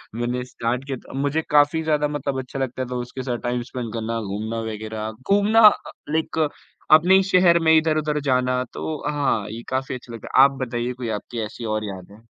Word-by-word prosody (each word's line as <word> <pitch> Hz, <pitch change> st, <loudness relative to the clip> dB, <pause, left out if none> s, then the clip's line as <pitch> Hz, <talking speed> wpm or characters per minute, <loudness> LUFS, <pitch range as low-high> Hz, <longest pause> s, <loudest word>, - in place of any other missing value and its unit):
मैंने 120 Hz, +1 st, -2 dB
स्टार्ट 125 Hz, +1 st, -3 dB
किया 135 Hz, -2 st, -4 dB
था। -, -, -12 dB
मुझे 145 Hz, +3 st, 0 dB
काफ़ी 150 Hz, +2 st, +4 dB
ज़्यादा 150 Hz, -1 st, +1 dB
मतलब 145 Hz, -2 st, -3 dB
अच्छा 130 Hz, +1 st, -6 dB
लगता 130 Hz, 0 st, -2 dB
था 125 Hz, 0 st, -5 dB
उसके 125 Hz, +1 st, -5 dB
साथ 120 Hz, -2 st, -2 dB
टाइम 120 Hz, 0 st, -1 dB
स्पेंड 120 Hz, -4 st, -5 dB
करना, 115 Hz, 0 st, -2 dB
घूमना 110 Hz, +3 st, -4 dB
वग़ैरह, 110 Hz, 0 st, -5 dB, 0.2 s
घूमना 210 Hz, +3 st, +4 dB
अ, -, -, +1 dB, 0.2 s
लाइक 160 Hz, 0 st, 0 dB, 0.4 s
अपने 170 Hz, +5 st, +7 dB
ही 195 Hz, -, +5 dB
शहर 180 Hz, -3 st, +4 dB
में, 160 Hz, -1 st, +4 dB
इधर-उधर 155 Hz, -1 st, +1 dB
जाना 125 Hz, -2 st, +1 dB
तो 155 Hz, -, -4 dB, 0.2 s
हाँ, 135 Hz, -8 st, 0 dB
ये 115 Hz, +2 st, -6 dB
काफ़ी 130 Hz, 0 st, -2 dB
अच्छा 120 Hz, -1 st, -10 dB
लगता 115 Hz, -, -5 dB
है। 135 Hz, -, +10 dB
आप 140 Hz, -, +6 dB
बताइए 120 Hz, +1 st, -3 dB
कोई 120 Hz, -2 st, -5 dB
आपकी 120 Hz, -, -8 dB
ऐसी 115 Hz, +2 st, -8 dB
और 110 Hz, 0 st, -2 dB
यादें? 100 Hz, +2 st, -9 dB
130 Hz, 200 wpm, -23 LUFS, 115-150 Hz, 0.4 s, है